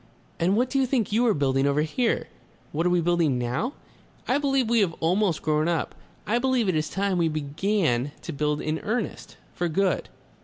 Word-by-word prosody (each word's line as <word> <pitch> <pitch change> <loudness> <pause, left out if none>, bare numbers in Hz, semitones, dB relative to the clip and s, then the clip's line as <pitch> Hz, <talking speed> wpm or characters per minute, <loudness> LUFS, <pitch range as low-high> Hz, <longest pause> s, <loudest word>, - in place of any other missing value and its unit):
And 185 +5 +2
what 250 +2 +1
do 275 - +1
you 265 - +2
think 240 -6 0
you 235 +3 +3
are 220 - +4
building 135 -1 +1
over 145 +2 +2
here?" 225 +10 0 0.4
"What 165 +4 0
are - - +3
we 175 -1 +2
building 165 -5 +2
now? 125 - -2 0.5
I 270 - +2
believe 270 -4 +1
we 235 0 +3
have 190 -5 +2
almost 180 0 +1
grown 155 0 +1
up. 170 -3 -1 0.3
I 230 +5 +1
believe 255 -3 +1
it 185 - +2
is 155 0 0
time 195 -2 0
we 165 -1 +2
began 150 - 0
to 165 - -5
build 150 +1 -1
in 155 +1 -2
earnest. 220 +1 -4 0.2
For 175 -1 -1
good...." 190 +4 0
175 Hz, 200 wpm, -25 LUFS, 155-225 Hz, 0.5 s, are